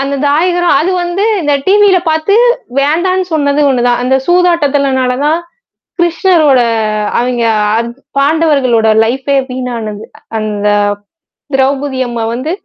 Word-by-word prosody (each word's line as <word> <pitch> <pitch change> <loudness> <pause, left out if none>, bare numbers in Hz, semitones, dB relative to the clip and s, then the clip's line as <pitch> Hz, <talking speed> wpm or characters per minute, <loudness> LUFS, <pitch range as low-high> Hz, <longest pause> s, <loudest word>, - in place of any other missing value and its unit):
அந்த 275 +1 -2
தாயகரம். 350 +3 +1
அது 355 +4 0
வந்து 350 +4 -2 0.2
இந்த 295 -1 0
டிவில 400 -1 +4
பாத்து 315 +7 +1 0.4
வேண்டான்னு 360 +6 0
சொன்னது 285 -1 +1
ஒன்னு 250 -2 0
தான். 245 0 +1
அந்த 260 +1 +1
சூதாட்டத்தலனால 285 -7 +1
தான் 315 +2 +1 0.6
கிருஷ்ணரோட 335 -5 +2 0.6
அவெங்க 245 -1 -1 0.3
அந் 235 0 -2 0.3
பாண்டவர்களோட 275 -6 +2 0.2
லைஃப்பே 270 +4 -1
வீணானது. 235 -5 -5 0.3
அந்த 210 -1 -3 0.9
திரௌபதி 270 0 0
அம்மா 235 -1 -4
வந்து 265 +7 -4
280 Hz, 115 wpm, -12 LUFS, 250-340 Hz, 0.9 s, டிவில